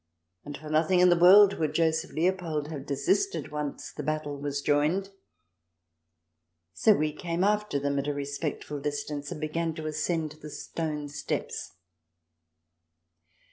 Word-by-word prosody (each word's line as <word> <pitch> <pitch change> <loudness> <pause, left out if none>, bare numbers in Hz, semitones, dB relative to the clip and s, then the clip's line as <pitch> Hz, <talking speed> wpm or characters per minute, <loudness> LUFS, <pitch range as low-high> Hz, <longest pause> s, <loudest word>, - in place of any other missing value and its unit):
And 145 -1 -7
for 155 +1 -9
nothing 160 +4 +3
in 180 0 +6
the 175 - +6
world 195 +3 +7
would 155 -2 -1
Joseph 160 0 +1
Leopold 165 -3 -1
have 145 -4 -7
desisted 380 - 0
once 150 -1 -5
the - - -5
battle 155 -1 -2
was 140 0 -3
joined. 155 +7 +1 1.6
So 215 - +5
we 155 -2 0
came 170 +3 -2
after 210 -5 +1
them, 140 0 0
at 140 - -3
a 145 - 0
respectful 145 +1 -4
distance, 145 0 -4
and - - -5
began 160 +1 -2
to 160 - -6
ascend 155 +1 -1
the 150 - -8
stone 150 -1 -4
steps. 145 - -4
155 Hz, 140 wpm, -28 LUFS, 145-170 Hz, 1.6 s, world